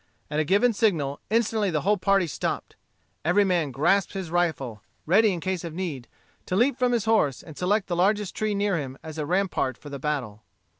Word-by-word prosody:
At 150 - 0
a - - +3
given 205 +9 +3
signal, 160 -11 +1
instantly 220 -2 +1
the 155 -4 0
whole 205 +6 +3
party 195 -1 +2
stopped. 160 - -4 0.5
Every 180 +6 +4
man 175 -6 +1
grasped 165 +9 +1
his 190 -4 -5
rifle, 140 -11 -1 0.2
ready 205 +6 +4
in 180 - -3
case 185 0 -2
of 165 -2 -6
need, 155 -10 -4 0.4
to 180 - -1
leap 245 +7 +3
from 250 -1 +1
his 235 -4 0
horse, 210 - +2
and 155 - -11
select 200 +4 +1
the 175 - -2
largest 200 +2 +1
tree 215 -1 -1
near 200 -2 +1
him 135 -2 -6
as 160 0 -7
a 150 - -2
rampart 180 -8 0
for 145 - -11
the 140 - -5
battle. 130 -8 -3
180 Hz, 205 wpm, -26 LUFS, 150-205 Hz, 0.5 s, Every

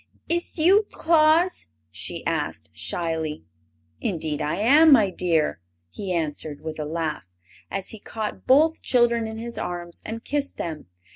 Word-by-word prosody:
"Is 345 +1 -2
you 390 +6 +5
Tlaus?" 325 +2 +3 0.2
she - - -4
asked, - - -2
shyly. 160 - -2 0.6
"Indeed 160 -5 -2
I 150 - -1
am, 285 - +6
my 215 -8 +6
dear!" 165 - +1 0.3
he 195 -3 -5
answered, 155 -3 -3
with 160 -1 -6
a 150 - -2
laugh, 155 - -3 0.4
as 195 -1 -4
he 220 - -8
caught 215 +1 -6
both 310 +5 +4
children 235 -2 +2
in 220 0 -6
his 235 +1 -5
arms 175 -1 -5
and 225 +1 -6
kissed 285 -1 -2
them. 160 -3 -5
210 Hz, 145 wpm, -24 LUFS, -, 0.6 s, am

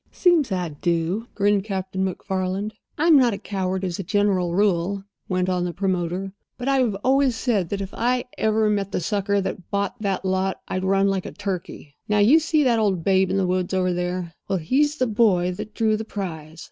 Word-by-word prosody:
"Seems 335 - +3
I 180 -3 -1
do," 170 +7 -1
grinned 205 -1 +2
Captain 190 -2 -3
MacFarland. 190 +2 -2 0.2
"I'm 325 +1 +5
not 245 -5 +4
a - - -6
coward, 190 -2 -3
as 180 -1 -3
a - - -2
general 185 -2 +1
rule," 195 0 +1 0.3
went 185 -1 0
on 180 -1 0
the 175 -1 -3
promoter, 185 0 -2 0.2
"but 250 - -5
I 270 -1 +3 0.2
always 265 -1 +3
said 215 -7 0
that 200 -1 -2
if 195 0 -6
I 245 +1 +1
ever 220 0 +2
met 200 -2 0
the - - -1
sucker 200 +2 0
that 190 -1 -5
bought 200 +3 -2
that 195 -2 -1
lot 190 0 0
I'd 185 - -2
run 195 +1 +3
like 195 -2 -1
a - - -7
turkey. 185 -7 -6 0.2
Now, 210 - +3
you 230 +10 +6
see 315 -1 +2
that 240 -4 +3
old 195 -6 +1
babe 190 0 +3
in 190 - 0
the 195 - +2
wood 180 0 -1
over 185 -1 +1
there? 180 -1 -3
Well, 195 - 0
he's 280 - +1
the 255 - +1
boy 205 -6 +2
that 210 +4 -7
drew 220 -1 +2
the 215 - -3
prize. 165 -7 -6
195 Hz, 205 wpm, -23 LUFS, 185-215 Hz, 0.3 s, you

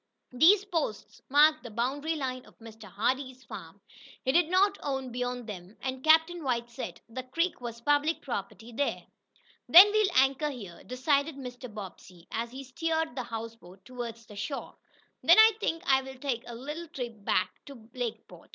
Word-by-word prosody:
These 365 +11 +5
posts 325 - -3
marked 305 +3 +5
the 240 - -9
boundary 270 +8 -1
line 255 -3 -3
of - - -20
Mr. 225 -1 -12
Hardee's 255 +6 -2
farm. - - -10 0.4
He 260 - +3
did 335 +2 +3
not 395 +2 +3
own 265 -3 -3
beyond 245 0 -3
them, 195 -1 -9
and 260 0 -4
Captain 320 +2 +4
White 240 -3 -1
said 180 -6 -6
the 240 +3 -6
creek 330 +6 -2
was 235 -1 -6
public 290 +4 +1
property 215 -2 -5
there. 280 +5 -2 0.6
"Then 385 +5 +10
we'll 430 -2 +3
anchor 270 +3 +3
here," 205 -11 -9
decided 280 +4 +1
Mr. 250 -2 -8
Bobbsey, 185 -4 -10
as 230 +1 -2
he 265 +2 -8
steered 320 +4 -2
the 260 - -2
houseboat 225 -6 -8
toward 240 -2 -6
shore. 230 +5 -6 0.5
"Then - - +6
I 440 0 +9
think 330 -4 -2
I'll 265 -3 +2
take 255 -3 -3
a 240 - -7
little 300 +7 -6
trip 240 - -7
back - - 0
to 245 -6 -12
Lakeport." 245 -3 -6
260 Hz, 165 wpm, -29 LUFS, 230-305 Hz, 0.6 s, Then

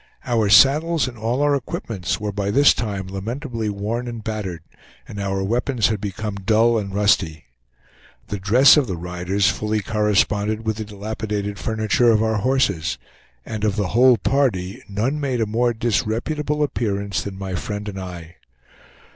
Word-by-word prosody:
Our 115 -4 +1
saddles 150 +8 +5
and 125 - -7
all 120 +5 -1
our 145 0 +3
equipments 105 -8 -3
were 105 -1 -3
by 100 0 -2
this 140 +7 +5
time 100 -5 -3
lamentably 115 +4 -4
worn 105 +5 -3
and 115 -2 -6
battered, 100 -7 -4 0.4
and 100 - -8
our 95 -1 -1
weapons 120 +3 +1
had 110 -3 -2
become 105 0 -4
dull 115 +2 +3
and 100 -2 -5
rusty. 95 -6 +1 0.8
The 105 - -3
dress 125 +10 +6
of 145 -4 +2
the 95 -4 -3
riders 90 +2 0
fully 110 0 -2
corresponded 105 0 +1
with 110 -1 -1
the 110 - -4
dilapidated 105 -1 -4
furniture 110 +2 +1
of 110 -1 +3
our 110 -1 +1
horses, 105 -8 0 0.5
and 110 -2 -5
of 105 -3 +1
the 100 -3 -1
whole 125 +2 +5
party 110 -11 0
none 115 +9 -1
made 135 -4 -1
a 115 - +2
more 120 +3 +1
disreputable 120 +7 -1
appearance 100 -6 -2
than 100 -1 -7
my 95 -1 -5
friend 105 +3 -4
and 95 -2 -5
I. 90 -2 -9
105 Hz, 165 wpm, -21 LUFS, 100-120 Hz, 0.8 s, dress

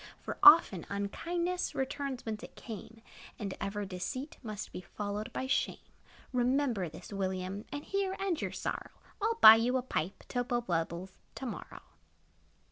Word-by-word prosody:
For, - - -6
often, 330 - +8
unkindness 340 - -2
Returns 265 -1 -3
whence 215 -1 -3
it - - -11
came; 225 0 -9 0.3
And 200 -4 -4
ever 205 +1 -2
deceit 200 - -5
must 215 -3 -6
Be - - -6
followed 205 +3 -5
by 260 - -3
shame. 260 - +1 0.6
Remember 250 - +1
this, 160 - -10
William, 190 +1 -3
And 290 +1 -4
here 390 -1 -1
end 385 -4 -1
your - - -2
sorrow; - - -4 0.3
I - - +1
'll 460 - +1
buy 220 +1 +12
you 245 +3 +2
a 250 - -2
pipe, 185 -7 -3
To 245 - 0
blow 240 -1 0
bubbles, 175 -1 -3 0.2
to 265 - -6
morrow. 240 - -7
225 Hz, 160 wpm, -32 LUFS, 195-275 Hz, 0.6 s, buy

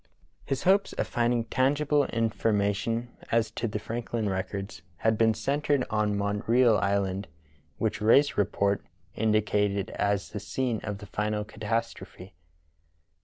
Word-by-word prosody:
His 135 -1 -2
hopes 195 +2 +3
of - - -1
finding 120 0 +1
tangible 145 +5 +2
information 115 0 0 0.2
as 115 -1 +2
to 115 +1 -2
the 105 - -3
Franklin 115 0 -3
records 95 -1 -4 0.2
had 110 +3 +2
been 110 0 +3
centred 140 +4 0
on 105 -1 +1
Montreal 105 +3 +3
Island, 100 0 0 0.5
which 110 -1 -1
Rae's 135 +7 +5
report 100 0 +1
(p. - - -31 0.3
139) - - 0
indicated 105 -2 +1
as 100 -1 -1
the 105 - -4
scene 115 +3 -2
of 105 -1 -4
the 105 - -10
final 105 +1 -2
catastrophe. 105 -3 -4
110 Hz, 135 wpm, -28 LUFS, 100-120 Hz, 0.5 s, Rae's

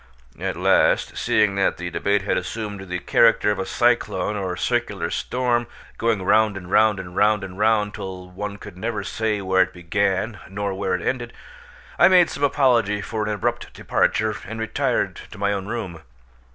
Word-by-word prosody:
At - - -3
last, - - +2
seeing 105 -2 +2
that 100 - +1
the 90 0 -5
debate 100 +2 0
had 100 - 0
assumed 100 0 -5
the 90 - -2
character 115 +2 +3
of 105 - -2
a 95 - -3
cyclone 105 -5 +1
or 95 -3 -3
circular - - -1
storm, 120 -2 0 0.3
going 115 -4 +1
round 105 +1 +3
and 90 -1 -9
round 110 -2 +4
and 90 -1 -8
round 105 -1 +3
and 95 -1 -7
round 105 -1 +2
till 95 -1 -7
one 100 +2 -5
could 105 -3 -11
never 110 -1 -3
say 110 +1 -2
where 95 0 +2
it 95 0 +1
began 100 +4 -1
nor 100 0 -3
where 95 -1 -1
it 90 - -5
ended, 120 -2 -2 0.7
I 175 - +8
made 180 -2 +5
some 145 - -5
apology 120 -8 +3
for 110 +2 -4
an 105 - -1
abrupt 105 -3 -2
departure 110 0 0
and 115 0 -6
retired 110 0 -1
to - - -11
my 100 0 0
own 100 -1 -4
room. 100 -8 -5
105 Hz, 180 wpm, -22 LUFS, 95-110 Hz, 0.7 s, I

